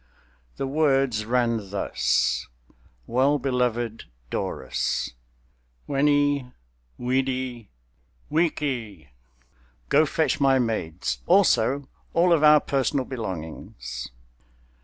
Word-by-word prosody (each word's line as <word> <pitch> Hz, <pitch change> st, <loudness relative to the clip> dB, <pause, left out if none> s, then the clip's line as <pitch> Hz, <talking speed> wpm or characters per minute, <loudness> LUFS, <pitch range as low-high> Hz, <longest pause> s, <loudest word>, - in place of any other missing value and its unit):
The -, -, -2 dB
words 135 Hz, -6 st, +1 dB
ran 115 Hz, -4 st, 0 dB
thus: 60 Hz, -10 st, 0 dB, 0.6 s
"Well 135 Hz, +4 st, +2 dB
beloved 125 Hz, -4 st, -1 dB, 0.3 s
'Dorus: -, -, -2 dB, 0.7 s
Veni, 145 Hz, -2 st, +2 dB, 0.5 s
vidi, 130 Hz, -2 st, -2 dB, 0.6 s
vici! 130 Hz, -, -1 dB, 0.8 s
Go 155 Hz, +2 st, +4 dB
fetch 160 Hz, 0 st, 0 dB
my 135 Hz, -1 st, +5 dB
maids; 90 Hz, -, -2 dB
also, 140 Hz, 0 st, +3 dB, 0.3 s
all 175 Hz, +1 st, +5 dB
of 155 Hz, -2 st, +2 dB
our 150 Hz, 0 st, +8 dB
personal 135 Hz, -1 st, 0 dB
belongings." 80 Hz, -, -6 dB
130 Hz, 80 wpm, -25 LUFS, 110-140 Hz, 0.8 s, our